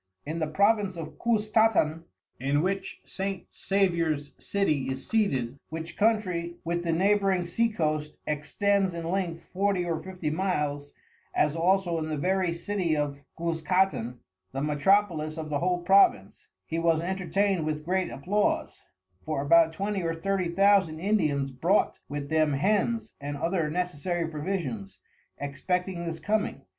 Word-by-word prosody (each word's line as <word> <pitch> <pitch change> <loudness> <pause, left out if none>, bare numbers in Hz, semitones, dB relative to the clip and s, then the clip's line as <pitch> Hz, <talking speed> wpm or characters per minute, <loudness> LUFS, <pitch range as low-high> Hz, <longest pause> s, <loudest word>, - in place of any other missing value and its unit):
In 160 +3 -3
the 155 - 0
Province 200 +2 +2
of 155 -2 -7
Cuztatan 215 -8 +2 0.3
in 140 +4 +1
which 195 +1 -2
S. 195 0 -3
Saviour's 170 -7 0
City 155 -10 0
is 130 0 -5
seated, 140 - 0
which 160 +1 -6
Country 185 -6 +1
with 170 +1 -1
the 170 - 0
Neighbouing 195 +1 +2
Sea 230 +7 +1
Coasts 155 -6 -2
extends 190 +5 0
in 165 -1 -4
Length 175 -2 -2
Forty 190 -1 +1
or 165 -2 -2
Fifty 180 -5 -4
Miles, 150 -5 -1 0.4
as 150 +1 +2
also 175 0 +2
in 155 0 -3
the 155 - -2
very 185 +3 +1
City 170 -1 -1
of 145 -1 -2
Cuzcatan, 165 -6 0 0.4
the 135 - -2
Metropolis 155 +1 +2
of 155 -1 -5
the 145 - +1
whole 180 0 0
Province, 185 - +3 0.2
he 165 - -2
was 165 -1 +3
entertain'd 190 0 0
with 155 0 -3
great 185 +1 0
Applause: 200 +9 -1 0.4
For 155 -3 -2
about 165 +2 +5
Twenty 195 +3 -2
or 165 -1 -1
Thirty 190 +1 -1
Thousand 190 -3 +3
Indians 155 -9 +1
brought 170 +11 +1
with 145 -1 -4
them 155 -2 +2
Hens 215 +7 +1
and 145 0 -4
other 165 0 0
necessary 175 0 -2
Provisions, 145 - -4 0.4
expecting 180 +5 -2
this 165 -1 -4
coming. 215 0 -1
170 Hz, 145 wpm, -28 LUFS, 150-195 Hz, 0.4 s, about